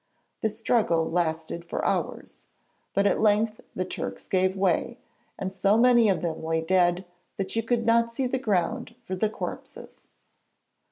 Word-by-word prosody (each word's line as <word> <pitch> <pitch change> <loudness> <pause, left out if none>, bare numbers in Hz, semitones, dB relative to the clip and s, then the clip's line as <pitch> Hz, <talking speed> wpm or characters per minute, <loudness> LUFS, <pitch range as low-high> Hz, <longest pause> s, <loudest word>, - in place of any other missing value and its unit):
The 220 - +2
struggle 215 -6 +1
lasted 165 -1 -1
for 170 - -4
hours, - - -2 0.5
but 200 - +1
at 200 - +2
length 215 +1 +2
the 185 - -1
Turks 95 - -6
gave 185 0 +1
way, 190 -3 +1 0.4
and 190 0 -4
so 200 +2 +3
many 240 -2 +5
of 190 - 0
them 160 -2 -3
lay 160 0 0
dead 180 +1 +2 0.3
that 195 +2 -3
you 225 - +2
could 230 0 0
not 230 0 +3
see 260 +3 -2
the 255 +1 -1
ground 225 +2 -1
for 190 -5 -4
the 210 +3 +1
corpses. - - -8
195 Hz, 160 wpm, -26 LUFS, 175-230 Hz, 0.5 s, many